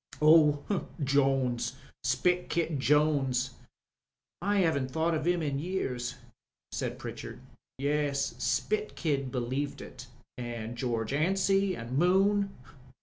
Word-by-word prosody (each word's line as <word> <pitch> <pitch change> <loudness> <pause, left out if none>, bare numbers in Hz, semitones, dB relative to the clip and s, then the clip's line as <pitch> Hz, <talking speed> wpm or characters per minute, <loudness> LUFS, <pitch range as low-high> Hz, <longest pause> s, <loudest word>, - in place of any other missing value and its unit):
"Oh, 155 +3 +4 0.2
Jones, 130 -3 +1 0.3
Spit 175 +8 +1
Kid 165 -4 0
Jones. 135 -3 +2 0.9
I 200 +1 +2
'aven't 140 -6 +1
thought 160 +4 0
of 155 0 -1
'im 175 -2 +2
in 140 -2 -1
years," 130 -8 -2 0.6
said - - -3
Pritchard. - - -7 0.4
"Yes, 140 0 0
Spit 430 0 0
Kid 140 -6 -1
believed 130 +3 -2
it, - - -10 0.3
an* 120 -2 -5
Greorge 120 -1 -2
Anstey 195 +4 +2
and 125 +2 -3
Moon. 195 +3 +3
145 Hz, 110 wpm, -30 LUFS, 130-175 Hz, 0.9 s, Oh